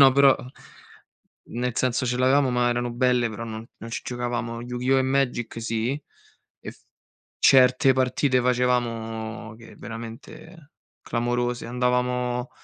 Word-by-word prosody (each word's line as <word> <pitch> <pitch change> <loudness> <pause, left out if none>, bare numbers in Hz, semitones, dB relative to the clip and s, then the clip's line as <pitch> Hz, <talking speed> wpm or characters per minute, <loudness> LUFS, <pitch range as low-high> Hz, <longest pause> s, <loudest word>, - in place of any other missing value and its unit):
no, 135 -1 +8
però 140 0 +6
n 125 +1 -11 1.1
nel 125 -1 -1
senso, 125 0 +1
ce 125 0 -1
l'avevamo 130 +2 +3
ma 125 -1 +2
erano 120 0 -1
belle, 125 -1 +2
però 110 +1 -6
non 110 0 -7
non 115 - -9
ci 115 - -4
giocavamo. 120 -1 -3
Yu-Gi-Oh! 125 +2 0
e - - +4
Magic 130 -3 -1
sì, 115 +5 -2 0.6
e - - -7
f - - -20 0.6
certe 130 +1 +5
partite 130 0 +1
facevamo 115 -3 -1
che 115 0 -14
veramente 115 +8 -10 0.3
clamorose. 120 0 -1
Andavamo 125 0 0
125 Hz, 135 wpm, -25 LUFS, 115-130 Hz, 1.1 s, no